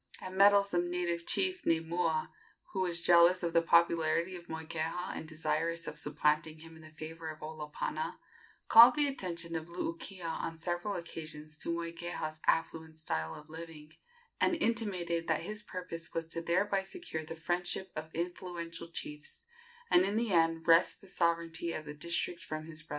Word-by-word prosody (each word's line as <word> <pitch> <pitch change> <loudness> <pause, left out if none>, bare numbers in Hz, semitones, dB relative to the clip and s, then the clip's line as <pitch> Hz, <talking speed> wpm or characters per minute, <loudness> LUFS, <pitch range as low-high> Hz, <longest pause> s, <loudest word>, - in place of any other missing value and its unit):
A 185 - -6
meddlesome 200 -2 +4
native 170 -1 -2
chief 370 -1 +1
named 165 0 +2
Mua, 165 -2 0 0.4
who 190 - -2
was 175 -2 0
jealous 175 +1 +6
of 170 -1 -1
the 170 - +5
popularity 170 +1 +3
of 175 -1 -10
Moikeha 160 +2 -3
and 160 - -6
desirous 165 +1 -1
of 150 - -3
supplanting 150 +1 +1
him 165 +1 -12
in 160 - -13
the 155 - -12
favor 160 +1 -7
of 155 0 -8
Olopana, 155 - -4 0.5
called 235 +2 +10
the 295 - +3
attention 170 -10 -3
of 160 0 -3
Luukia 170 +1 -5
on 165 0 -3
several 175 +4 -2
occasions 155 -3 -6
to - - -3
Moikeha's 170 -2 -3
affluent 160 -1 0
style 80 - -2
of 150 - -11
living, 160 -1 -9 0.5
and 350 - +3
intimated 190 - 0
that - - +1
his 210 0 -4
purpose 180 -4 -5
was 165 0 -1
to 165 +1 -4
thereby 190 +4 +1
secure 190 - -5
the 160 +1 -7
friendship 175 +3 -2
of 155 +1 -5
influential 170 -1 -4
chiefs, 150 -3 -6 0.5
and 180 - +7
in 200 +2 0
the 225 -3 +1
end 165 -1 +3
wrest 165 +1 +5
the 195 - -15
sovereignty 170 -1 0
of 155 - -5
the 150 - -6
district 170 +3 -2
from 155 0 -5
his 155 -1 -7
brother. 150 - -20
170 Hz, 170 wpm, -32 LUFS, 160-180 Hz, 0.5 s, called